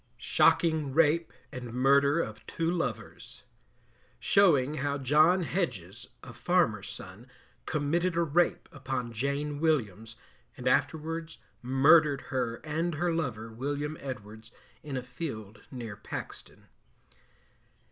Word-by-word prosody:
SHOCKING 155 +2 +2
RAPE 165 -1 +3 0.2
AND 125 -2 -7
MURDER 140 +4 +4
OF - - -6
TWO 165 0 -1
LOVERS. 175 -1 -5 0.8
Showing 155 -8 +3
how 140 +1 -1
John 155 +7 +4
Hedges, 125 - -3 0.2
a 125 - -10
farmer's 140 - +1
son, 100 +6 -9 0.4
committed 165 +4 0
a 170 - +3
rape 170 +2 +1
upon 130 -3 -4
Jane 140 +4 -2
Williams, 115 - 0 0.4
and 125 - -4
afterwards 160 +5 -1 0.2
Murdered 140 +3 +4
her 125 -3 0
and 160 +2 -2
her 170 +2 0
lover, 120 -9 -3
William 145 +5 -3
Edwards, 110 -4 -8 0.3
in 140 -3 -5
a 125 - -4
field 120 -6 -7
near 115 -5 -7
Paxton. 110 - -9
140 Hz, 115 wpm, -29 LUFS, 125-160 Hz, 0.8 s, MURDER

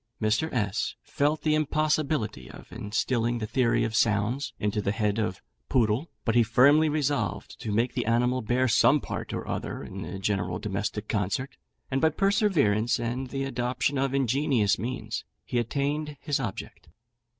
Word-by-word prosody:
Mr. 110 +9 +1
S 105 -2 -1
felt 150 +2 0
the 155 - +2
impossibility 150 - 0
of - - -13
instilling 115 +2 -1
the 110 - -3
theory 115 +1 +2
of 110 -1 -2
sounds 115 +3 +1
into 105 +1 -1
the 100 - 0
head 105 0 0
of 105 -4 -2 0.3
Poodle, 120 +5 +2 0.2
but 115 - +2
he 120 - +5
firmly 140 +8 +5
resolved 145 - -1
to 110 - -3
make 115 +4 +1
the - - -2
animal 125 +2 +2
bear 125 +4 +1
some 115 - +5
part - - -5
or - - -4
other - - -4
in - - -7
the 90 +3 -5
general 95 -3 -1
domestic 105 +1 -3
concert; 105 +5 -1 0.4
and 135 +1 +1
by 160 - +5
perseverance, 155 - +2
and 120 +3 -2
the 135 0 -2
adoption 130 +1 -1
of 135 0 0
ingenious 130 -6 +2
means, 110 -1 -4 0.2
he 125 - 0
attained 145 +5 -2
his 145 -2 0
object. 105 -9 -6
120 Hz, 160 wpm, -27 LUFS, 105-140 Hz, 0.4 s, he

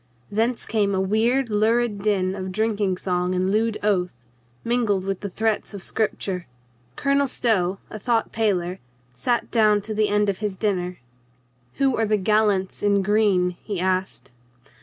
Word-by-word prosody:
Thence 225 +4 0
came 205 -3 +1
a - - +1
weird, 225 +6 +1
lurid 220 0 +1
din 195 -3 +1
of 190 -1 -5
drinking 205 -2 0
song 180 0 -1
and 185 +1 +1
lewd 220 +1 +1
oath, 185 -4 +1 0.5
mingled 225 -6 +1
with 195 -1 -2
the 200 - -5
threats 220 +1 -1
of 195 - -8
scripture. 195 -4 -2 0.5
Colonel 280 0 +2
Stow, 195 -7 +1
a 215 - -6
thought 230 +1 0
paler, 190 -5 0 0.3
sat 235 - -1
down 215 -3 +4
to 215 +2 -5
the 215 0 +1
end 210 0 +2
of 195 -2 -1
his 210 -3 -3
dinner. 180 -4 -1 0.8
"Who 270 -2 +2
are 225 -1 +1
the 215 0 +2
gallants 205 -1 +1
in 200 -1 +2
green?" 200 -3 +3
he 200 -4 -4
asked. 185 -8 -1
205 Hz, 160 wpm, -23 LUFS, 190-220 Hz, 0.8 s, down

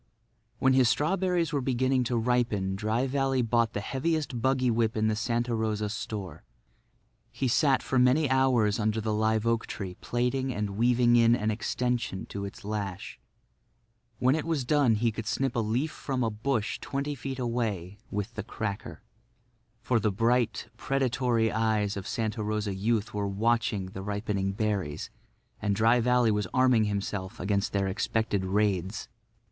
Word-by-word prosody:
When 130 0 +3
his 130 -2 +5
strawberries 170 +4 +1
were 140 - +1
beginning 130 0 +1
to 120 0 0
ripen 115 -5 +1
Dry 110 +5 0
Valley 135 -1 +1
bought 115 -1 +1
the 100 - -2
heaviest 140 +1 -2
buggy 130 -1 +2
whip 115 -1 +1
in 110 0 +2
the 110 - +1
Santa 120 +2 -1
Rosa 110 -2 -1
store. 100 -3 -5 0.9
He 135 - -1
sat 135 +2 +3
for 130 - +1
many 130 +5 +4
hours 130 -5 +2
under 110 0 0
the 110 0 -1
live 110 +1 +1
oak 115 0 +1
tree 95 -4 -5
plaiting 125 +2 -1
and 105 -3 -2
weaving 120 +3 +3
in 115 0 +5
an 110 -2 0
extension 115 -2 -2
to 100 0 -4
its 100 - -9
lash. 100 -3 -4 1.0
When 130 +3 +3
it 155 0 -1
was 160 -6 -1
done 140 -4 +3
he 115 +2 +1
could 110 -1 -6
snip 135 +2 -1
a - - +1
leaf 120 +8 0
from 130 -3 -3
a 115 - 0
bush 110 +1 -1
twenty 140 +1 -3
feet 135 0 -5
away 110 -6 -2
with 105 +3 -3
the 110 - -4
cracker. 105 -1 -5 0.8
For 120 -2 +2
the 105 0 +1
bright, 115 +2 +1
predatory 125 -4 +1
eyes 110 -2 +1
of 100 -2 -5
Santa 110 -1 -2
Rosa 105 -1 -1
youth 110 +2 -1
were 100 -1 -1
watching 105 0 0
the 95 +1 -7
ripening 100 -1 -2
berries, 95 -8 -2 0.5
and 100 -1 +1
Dry 115 +4 +4
Valley 125 -1 +3
was 105 -2 0
arming 130 -4 +4
himself 100 0 -3
against 100 +2 0
their 100 -1 0
expected 100 0 -1
raids. 95 0 0
115 Hz, 165 wpm, -28 LUFS, 105-125 Hz, 1.0 s, his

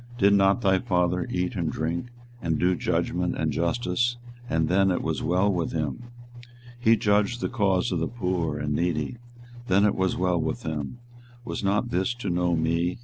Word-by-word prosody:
did 100 -1 +5
not 100 +3 +4
thy 95 -3 +3
father 90 -1 0
eat 90 0 -1
and 85 -5 -1
drink, 85 +8 -2 0.3
and 80 -4 0
do 90 +1 +2
judgment - - -1
and - - 0
justice, 120 +6 0 0.3
and 80 -1 +1
then 95 +3 +3
it 90 - 0
was - - -2
well 95 +4 +2
with 85 -2 -2
him? 80 - -3 0.4
24:022:016 120 0 -19 0.3
He 115 -1 +4
judged 105 +2 +2
the - - -1
cause 100 -7 +1
of 90 - 0
the 80 - 0
poor 90 -9 -2
and 75 0 -2
needy; 85 +4 -1 0.5
then 100 +2 +4
it 105 - +3
was 95 0 0
well 90 -2 +1
with 80 0 -3
him: 75 - -4 0.5
was 120 - -4
not 105 +5 +1
this 95 +7 0
to 110 -6 -3
know 90 0 +1
me? 85 +2 0
90 Hz, 190 wpm, -26 LUFS, 85-100 Hz, 0.5 s, did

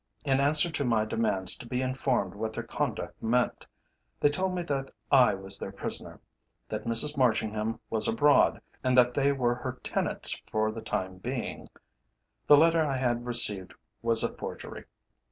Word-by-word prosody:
In 135 -1 +1
answer 150 +4 +3
to 145 - -2
my 115 -4 0
demands 95 -4 +2
to 120 - -10
be 125 +1 -3
informed 130 -6 -2
what 110 +2 -5
their - - -5
conduct - - -5
meant, 120 +2 -1 0.5
they 145 - +3
told 185 +4 -1
me 175 - -3
that 135 -4 -4 0.2
I 130 -6 +5
was 95 0 -4
their - - -6
prisoner, - - -6 0.5
that 110 0 -5
Mrs 115 +6 +7
Marchingham 110 -2 -1
was 110 -1 +3
abroad, 145 +5 +2 0.2
and 130 -1 +1
that 125 0 +4
they 140 +1 +1
were 125 -3 0
her 125 +1 -6
tenants - - -1
for 110 0 0
the 110 +1 -8
time 95 -4 -5
being. 125 +4 -6 0.8
The 145 - +7
letter 165 +2 +3
I 140 -3 -2
had 120 -1 -2
received 105 -6 +4 0.3
was 115 -1 +3
a - - -2
forgery. - - -9
120 Hz, 170 wpm, -27 LUFS, 110-135 Hz, 0.8 s, Mrs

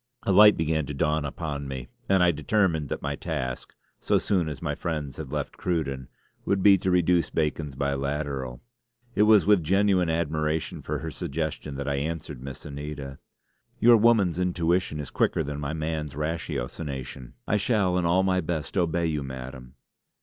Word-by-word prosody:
A - - +1
light 105 +2 +8
began 80 -2 0
to 75 - -5
dawn 75 0 +1
upon 70 -1 -4
me, 65 -2 -6 0.2
and 95 -2 +4
I 90 - +5
determined 80 -1 +1
that - - -4
my - - -2
task 65 0 -4 0.2
so - - +2
soon 90 -6 0
as 75 - -6
my - - -2
friends 75 -5 -4
had 75 -4 -7
left 75 -2 -3
Cruden 70 -7 -2 0.4
would 100 -1 0
be 100 -1 +8
to 95 - -1
reduce 90 -1 +3
Bacon's 75 -3 -2
biliteral. 70 -2 -2 0.5
It - - +1
was 105 -6 +6
with 105 -2 +5
genuine 95 +1 +2
admiration 80 -1 -1
for - - -3
her - - -5
suggestion 75 -1 -4
that 70 +1 -4
I 70 -1 0
answered 75 -3 -4
Miss 65 0 -8
Anita: 70 -1 -7 0.6
"Your 120 +1 +7
woman's 105 -7 +4
intuition 90 -2 0
is 75 - -6
quicker - - +1
than 75 0 -5
my 75 +1 -3
man's 80 -3 -3
ratiocination. 70 -4 -4
'I 105 - +2
shall 100 -4 +1
in - - -1
all 85 +2 +3
my 95 -1 +2
best 80 0 -4
obey 85 -1 +1
you, 75 -2 -1
Madam!'" 65 -1 -8
80 Hz, 170 wpm, -26 LUFS, 70-90 Hz, 0.6 s, light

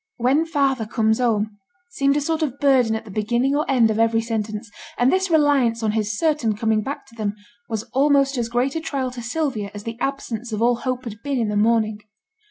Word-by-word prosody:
'When 270 +7 +2
father 275 -7 +1
comes 220 -1 +1
home,' 215 -4 0 0.3
seemed 280 -3 +2
a - - +1
sort 320 +2 -1
of 280 -4 -1
burden 255 -5 +3
at 220 - -5
the 210 - -10
beginning 235 +7 0
or 300 +2 -1
end 240 -5 +4
of 220 - -2
every 225 0 +3
sentence, 220 -1 -3 0.3
and 245 +3 +3
this 380 0 +1
reliance 280 -8 +3
on 215 - +2
his 210 -1 -1
certain 295 -9 +1
coming 220 -1 +1
back 275 +7 -5
to 230 - -18
them 210 -2 -2 0.3
was 220 -2 -2
almost 275 0 +3
as 235 -2 -2
great 245 +4 0
a 325 - -1
trial 270 -5 -2
to 245 -1 -7
Sylvia 245 -5 -2
as 205 - -7
the 230 +1 -6
absence 245 -4 -3
of 215 - -2
all 240 +1 +3
hope 255 0 -3
had 220 -2 -8
been 280 -1 -1
in 225 -3 0
the 210 - -2
morning. 215 0 +2
240 Hz, 220 wpm, -22 LUFS, 220-275 Hz, 0.3 s, end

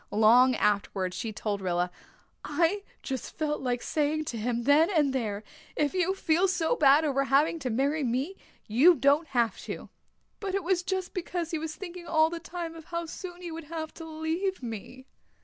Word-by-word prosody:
Long 240 +4 +5
afterwards 195 -3 0
she 225 - -3
told 210 -1 -3
Rilla, 180 -1 0 0.5
"I 335 +7 +1 0.2
just 265 -2 -5
felt 300 -1 -1
like 245 -2 -1
saying 305 0 0
to - - -4
him 235 +1 -1
then 290 +5 +5
and 300 -8 +2
there, 215 -5 -2 0.3
'If 295 +1 +1
you 375 +1 +1
feel 345 +1 +2
so 360 -3 +1
bad 290 +1 +5
over 275 -2 +1
having 285 +5 +3
to 260 -4 -3
marry 280 +6 +1
me 260 +9 -1 0.3
you 280 +12 +6
don't 285 +4 +3
have 235 -5 0
to.' - - -7 0.5
But 395 -2 -3
it 395 - -1
was 360 +1 +1
just 375 0 -3
because 350 -2 -3
he 325 - -1
was 310 0 -5
thinking 350 0 -8
all 315 0 +3
the 340 - -4
time 340 -1 -6
of 325 -1 -11
how 340 0 -3
soon 355 +2 -8
he 345 - -5
would 325 -1 -7
have 315 0 -5
to 330 - -9
leave 320 +3 -2
me." 240 +3 -7
310 Hz, 190 wpm, -28 LUFS, 255-340 Hz, 0.5 s, you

